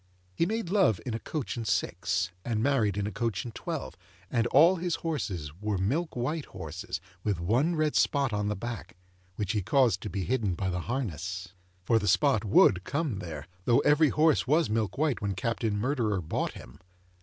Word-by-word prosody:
He 165 - +1
made 220 -4 -2
love 190 - +3
in 125 - -3
a 115 - -2
coach 150 0 -4
and 115 -2 -4
six, 90 -3 0
and 115 -2 -1
married 115 -8 +2
in 100 - 0
a 105 - -3
coach 115 -3 -2
and 120 - -7
twelve, - - -5 0.4
and 115 0 +2
all 165 +9 +6
his 175 0 -1
horses 95 - -2
were 105 -2 -1
milk 140 - -1
white 145 +6 -2
horses 90 0 -6 0.2
with 100 -5 0
one 125 - +1
red 155 -1 +1
spot 140 -5 +2
on 105 0 0
the 105 - -1
back 115 -3 -6 0.4
which 100 -1 -2
he 105 -3 0
caused 110 -1 +3
to - - -5
be 95 +2 -3
hidden 110 -5 0
by 95 +1 -2
the 90 - -2
harness. 90 - -3 0.3
For, 115 +4 +3
the 105 - -3
spot 135 -6 +3
would 95 -3 +5
come 140 - -2
there, 80 -6 -6 0.2
though 120 - +4
every 150 +1 +4
horse 155 -2 +3
was 150 -4 +3
milk 110 0 -1
white 150 -3 +1
when 100 -2 -1
Captain 110 +1 -1
Murderer 110 -4 0
bought 80 -3 -2
him. 65 +4 -12
110 Hz, 195 wpm, -29 LUFS, 95-140 Hz, 0.4 s, all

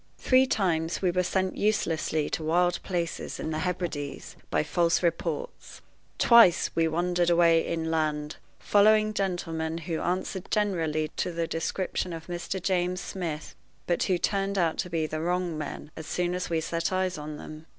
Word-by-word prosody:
Three 260 0 +4
times 170 -6 0
we 180 - +3
were 180 +1 +1
sent 185 +1 0
uselessly 165 -7 0
to 160 - -2
wild 175 +2 +2
places 170 -3 -3
in 160 - -3
the 155 - -2
Hebrides 170 -5 -4
by - - +1
false 170 +3 +1
reports. 325 - -3 0.3
Twice 230 -8 +6
we 165 0 +2
wandered 175 +2 +1
away 170 -1 +5
inland, 155 -3 -1 0.2
following 215 +1 +4
gentlemen 165 -5 -2
who 165 -1 -3
answered 185 +1 -2
generally 165 -7 0
to 180 - -1
the 165 0 -1
description 175 +2 -2
of 165 -1 -7
Mr. 175 +2 -4
James 180 0 0
Smith, 165 -6 -5 0.3
but 175 - 0
who 185 - +2
turned 195 +2 -1
out 170 -3 +1
to 180 - -1
be 165 -2 0
the 155 0 -4
wrong 175 0 -1
men 150 0 -6
as 160 -1 -8
soon 175 +1 -1
as 180 0 -3
we 165 -1 0
set 165 +2 -2
eyes 185 -3 0
on 150 0 -6
them. 155 +1 -10
170 Hz, 165 wpm, -27 LUFS, 160-185 Hz, 0.3 s, Twice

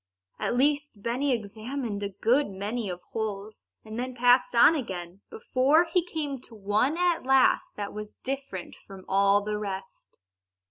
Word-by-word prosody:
At - - -1
least, 285 -5 0
Benny 260 +4 0
examined 225 0 -3
a 200 - -2
good 235 +8 +2
many 200 +2 -3 0.2
holes, 215 -1 -5 0.2
and 220 +1 -6
then 255 0 -4
passed 245 0 +4
on 235 +7 +7
again, 190 - -5
before 270 +8 +3
he 360 - +3
came 295 -6 -4
to 230 - -13
one 215 +9 +1
at 355 -1 +1
last 265 0 +4
that 205 -1 -5
was 210 0 -8
different 270 -9 -5
from 195 -1 -13
all 200 +1 +4
the 210 0 -2
rest. 195 -2 -7
230 Hz, 150 wpm, -27 LUFS, 200-270 Hz, 0.2 s, on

